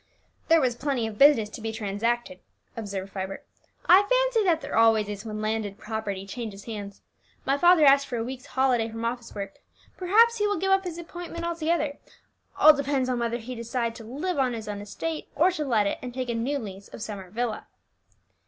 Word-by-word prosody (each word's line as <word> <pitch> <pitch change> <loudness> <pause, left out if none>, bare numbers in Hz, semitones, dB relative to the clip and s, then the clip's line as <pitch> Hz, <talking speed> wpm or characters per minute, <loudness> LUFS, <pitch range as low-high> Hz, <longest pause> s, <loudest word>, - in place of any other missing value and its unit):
"There 330 0 +6
was 255 -5 +2
plenty 265 -2 -1
of 215 -1 -6
business 275 -7 +6
to 225 - -9
be 225 0 -3
transacted," 220 -1 -2 0.4
observed 195 -3 -5
Vibert; 190 0 -5 0.4
"I 370 +3 +8
fancy - - +3
that 340 -4 +3
there 280 - -5
always 225 -2 +4
is 205 +1 -6
when 215 -1 -5
landed 215 -2 -2
property 210 -3 -4
changes 205 -1 -7
hands. 205 -3 -7 0.4
My 275 - +2
father 345 +1 +6
asked 275 0 +6
for 245 - -3
a 225 - -1
week's 260 +3 -7
holiday 250 -4 +1
from 225 +1 -5
office 235 0 -4
work. 200 -1 -6 0.4
Perhaps 450 +6 +4
he 415 -1 +1
will 410 -1 0
give 385 +3 0
up 385 0 +3
his 345 -2 -5
appointment 340 0 -7
altogether; 325 -3 -1 0.6
all 310 0 +8
depends 275 -2 0
on 250 -1 0
whether 235 0 -1
he 245 +2 -7
decide 235 0 -2
to 230 - -10
live 285 +9 -3
on 255 -2 +2
his 220 -2 -6
own 205 -1 -4
estate, 310 +10 -5
or 345 +6 +4
to 330 -4 -3
let 230 -7 +2
it 200 - -1
and 250 -1 -7
take 255 -1 -3
a - - 0
new 245 +5 -1
lease 200 -5 -8
of 215 - -8
Summer 200 -5 -7
Villa." 225 +2 -3
240 Hz, 205 wpm, -26 LUFS, 215-305 Hz, 0.6 s, I